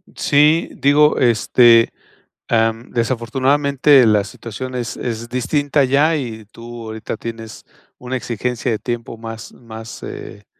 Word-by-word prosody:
Sí, 150 Hz, +3 st, +3 dB
digo, 150 Hz, +2 st, +3 dB
este, 115 Hz, 0 st, +4 dB, 0.6 s
em, 115 Hz, 0 st, 0 dB
desafortunadamente, 130 Hz, +3 st, +2 dB
la 105 Hz, -2 st, +3 dB
situación 120 Hz, +5 st, -8 dB
es 120 Hz, -1 st, -4 dB
es 115 Hz, -1 st, -5 dB
distinta 140 Hz, +3 st, 0 dB
ya. 145 Hz, +5 st, +2 dB
Y 115 Hz, -7 st, -5 dB
tú 115 Hz, +1 st, -11 dB
ahorita 110 Hz, 0 st, -6 dB
tienes 115 Hz, 0 st, -8 dB, 0.3 s
una 125 Hz, +1 st, -5 dB
exigencia 125 Hz, 0 st, -3 dB
de 110 Hz, -, -2 dB
tiempo 115 Hz, 0 st, -5 dB
más 115 Hz, -1 st, -9 dB
más, 115 Hz, -1 st, -11 dB
eh 100 Hz, 0 st, -9 dB
120 Hz, 125 wpm, -18 LUFS, 115-135 Hz, 0.6 s, este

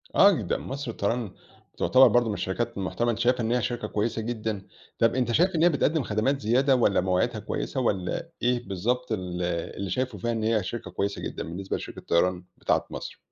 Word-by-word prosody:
آه 200 Hz, -, +8 dB
جدًا، 185 Hz, -, -1 dB
مصر 135 Hz, -2 st, -5 dB
للطيران 110 Hz, 0 st, -1 dB, 0.5 s
تعتبَر 130 Hz, +1 st, +6 dB
برضه 120 Hz, +1 st, +3 dB
من 110 Hz, -, -1 dB
الشركات 115 Hz, +4 st, -2 dB
المحترَمة، 120 Hz, +5 st, 0 dB
أنتَ 115 Hz, -, -4 dB
شايِفها 125 Hz, +1 st, +2 dB
إن 115 Hz, 0 st, 0 dB
هي 125 Hz, 0 st, +2 dB
شركة 120 Hz, +2 st, -2 dB
كويِّسة 110 Hz, +2 st, -1 dB
جدًا، 110 Hz, -3 st, -3 dB, 0.3 s
طب 115 Hz, +1 st, +3 dB
أنتَ 125 Hz, -2 st, +1 dB
شايِف 175 Hz, +9 st, +3 dB
إن 160 Hz, -, +3 dB
هي 175 Hz, -, +7 dB
بتقدِّم 155 Hz, -1 st, +1 dB
خدمات 125 Hz, +6 st, 0 dB
زيادة، 130 Hz, +5 st, +3 dB
والّا 105 Hz, -7 st, +3 dB
مواعيدها 95 Hz, +5 st, +1 dB
كويِسة، 110 Hz, +5 st, -3 dB
والّا 95 Hz, -7 st, -1 dB
إيه 120 Hz, -1 st, 0 dB
بالضبط 120 Hz, +7 st, -1 dB
ال 90 Hz, -4 st, -3 dB, 0.4 s
اللي 100 Hz, 0 st, -3 dB
شايِفه 125 Hz, 0 st, -2 dB
فيها 120 Hz, +5 st, -1 dB
إن 115 Hz, -1 st, -2 dB
هي 110 Hz, -2 st, +2 dB
شركة 95 Hz, +1 st, -5 dB
كويِسة 100 Hz, +2 st, -2 dB
جدًا، -, -, -4 dB
بالنسبة 95 Hz, +4 st, -4 dB
لشركة -, -, -8 dB
الطيران 90 Hz, +1 st, +1 dB
بتاعة -, -, 0 dB
مصر؟ -, -, -7 dB
115 Hz, 200 wpm, -27 LUFS, 100-125 Hz, 0.5 s, آه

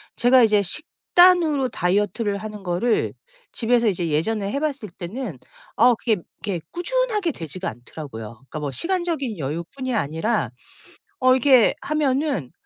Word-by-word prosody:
제가 250 Hz, +1 st, +5 dB
이제 210 Hz, -2 st, +4 dB
식단으로 315 Hz, -, +3 dB
다이어트를 205 Hz, +2 st, 0 dB
하는 210 Hz, -1 st, -8 dB
거를 185 Hz, +6 st, 0 dB, 0.4 s
집에서 235 Hz, 0 st, +2 dB
이제 180 Hz, -4 st, 0 dB
예전에 195 Hz, +7 st, -1 dB
해 280 Hz, -, -1 dB
봤을 275 Hz, -, -3 dB
때는 185 Hz, -, -6 dB, 0.4 s
어 245 Hz, +2 st, +6 dB
그게 225 Hz, 0 st, 0 dB, 0.3 s
이렇게 185 Hz, -5 st, -2 dB
꾸준하게 425 Hz, -1 st, 0 dB
되지가 175 Hz, -, -5 dB
않더라고요. 120 Hz, 0 st, -9 dB
그러니까 135 Hz, +6 st, -9 dB
뭐 145 Hz, -2 st, -3 dB
시간적인 335 Hz, -, -1 dB
여유뿐이 170 Hz, -, -4 dB
아니라 165 Hz, -, 0 dB, 0.8 s
어 255 Hz, -, +7 dB
이렇게 260 Hz, -2 st, +5 dB
하면은 280 Hz, -, -1 dB
225 Hz, 335 characters per minute, -23 LUFS, 175-275 Hz, 0.8 s, 어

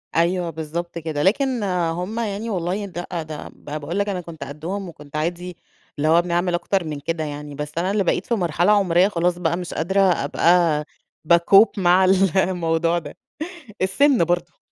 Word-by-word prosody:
أيوه 170 Hz, +1 st, +1 dB
بالضبط 165 Hz, +2 st, -5 dB
كده، 155 Hz, -3 st, -3 dB
لكن 250 Hz, +3 st, +1 dB
هُم 180 Hz, +3 st, -1 dB
يعني 220 Hz, 0 st, -3 dB
والله 190 Hz, +1 st, -2 dB
ده 175 Hz, -2 st, -6 dB, 0.2 s
ده 155 Hz, -1 st, -8 dB
ب -, -, -18 dB
باقول 150 Hz, +5 st, -4 dB
لَك 200 Hz, 0 st, 0 dB
أنا 185 Hz, -2 st, -2 dB
كنت 165 Hz, -2 st, -9 dB
قدّهم 175 Hz, +7 st, -5 dB
وكنت 150 Hz, -3 st, -13 dB
عادي 175 Hz, +3 st, -3 dB, 0.4 s
اللي 150 Hz, +2 st, 0 dB
هو 165 Hz, +2 st, +5 dB
بنعمل 175 Hz, +1 st, 0 dB
أكتر 180 Hz, +1 st, 0 dB
من 150 Hz, -2 st, -4 dB
كده 160 Hz, +2 st, -3 dB
يعني، 145 Hz, -1 st, -6 dB
بس 150 Hz, 0 st, -5 dB
أنا 180 Hz, +3 st, 0 dB
اللي 205 Hz, -1 st, +1 dB
بقيت 175 Hz, -, 0 dB
في 235 Hz, -, 0 dB
مرحلة 175 Hz, +1 st, +1 dB
عمرية 190 Hz, -2 st, +4 dB
خلاص 175 Hz, -2 st, 0 dB
بقى 170 Hz, 0 st, 0 dB
مش 180 Hz, -1 st, -6 dB
قادرة 190 Hz, +5 st, +1 dB
أبقى 170 Hz, -2 st, +3 dB, 0.4 s
بَاكوب 175 Hz, +6 st, +6 dB
مع 185 Hz, +1 st, +4 dB
ال 190 Hz, -1 st, +3 dB
الموضوع 170 Hz, -2 st, +1 dB
ده. -, -, -11 dB, 0.7 s
السن 245 Hz, -, +3 dB
برضه. 175 Hz, -1 st, -2 dB
175 Hz, 175 wpm, -22 LUFS, 160-190 Hz, 0.7 s, بَاكوب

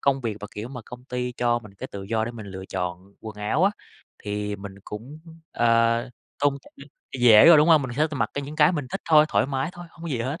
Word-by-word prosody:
công 135 Hz, -1 st, +1 dB
việc 110 Hz, -4 st, -3 dB
mà, 105 Hz, -, -6 dB
kiểu, 105 Hz, +3 st, -6 dB
mà 125 Hz, -2 st, -8 dB
công 125 Hz, +1 st, -11 dB
ty 125 Hz, -1 st, -3 dB
cho 120 Hz, -1 st, +1 dB
mình 105 Hz, -4 st, -15 dB
cái -, -, -7 dB
tự 100 Hz, -1 st, -6 dB
do 110 Hz, +2 st, -1 dB
để 120 Hz, -, -4 dB
mình 110 Hz, -4 st, -9 dB
lựa 95 Hz, -1 st, -8 dB
chọn 90 Hz, +2 st, -5 dB
quần 110 Hz, -1 st, -9 dB
áo 110 Hz, -, +1 dB
á, 200 Hz, -, +4 dB, 0.5 s
thì 105 Hz, 0 st, -3 dB
mình 100 Hz, 0 st, -9 dB
cũng, 120 Hz, +9 st, -8 dB, 0.3 s
ờ, 115 Hz, 0 st, +3 dB, 0.4 s
tôn 145 Hz, -1 st, +3 dB
trọng -, -, -19 dB, 0.5 s
dễ 115 Hz, -1 st, +8 dB
rồi, 170 Hz, -2 st, +9 dB
đúng 150 Hz, +2 st, +4 dB
không? 160 Hz, -3 st, +6 dB
Mình 130 Hz, -, -4 dB
sẽ 155 Hz, +1 st, +3 dB
t -, -, -16 dB
mặc 140 Hz, -, -1 dB
cái 140 Hz, -, -2 dB
những 150 Hz, +2 st, -8 dB
cái 150 Hz, +4 st, +5 dB
mình 145 Hz, -6 st, -3 dB
thích -, -, -4 dB
thôi, 155 Hz, -1 st, +7 dB
thoải -, -, +2 dB
mái 135 Hz, +1 st, -2 dB
thôi, 175 Hz, 0 st, -10 dB
hông 165 Hz, -, -16 dB
có 170 Hz, -, -5 dB
gì 125 Hz, -6 st, -2 dB
hết. 140 Hz, +9 st, -3 dB
120 Hz, 265 wpm, -24 LUFS, 105-145 Hz, 0.5 s, rồi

